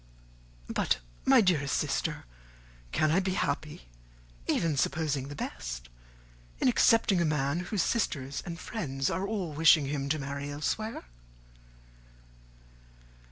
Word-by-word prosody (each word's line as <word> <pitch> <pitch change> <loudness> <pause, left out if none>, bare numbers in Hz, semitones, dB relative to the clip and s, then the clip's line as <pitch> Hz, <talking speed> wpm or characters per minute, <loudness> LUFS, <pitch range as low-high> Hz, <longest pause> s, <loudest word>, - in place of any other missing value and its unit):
"But, 65 - 0 0.3
my 265 -2 +7
dear 170 -8 +2
sister, - - -1 0.7
can 155 -1 +2
I 170 - +4
be 185 -1 -1
happy, 145 - -2 0.6
even 165 -3 +1
supposing 140 -1 0
the 145 - -7
best, - - -5 0.7
in - - +2
accepting 225 -6 +4
a - - +4
man 150 +1 0
whose 180 0 -1
sisters 140 - -1
and 170 -1 -6
friends 135 - -2
are 185 +4 -1
all 195 -7 -3
wishing 155 -1 +6
him 140 0 -2
to 155 - +1
marry 140 0 -4
elsewhere?" 185 +10 -3
155 Hz, 120 wpm, -29 LUFS, 140-185 Hz, 0.7 s, my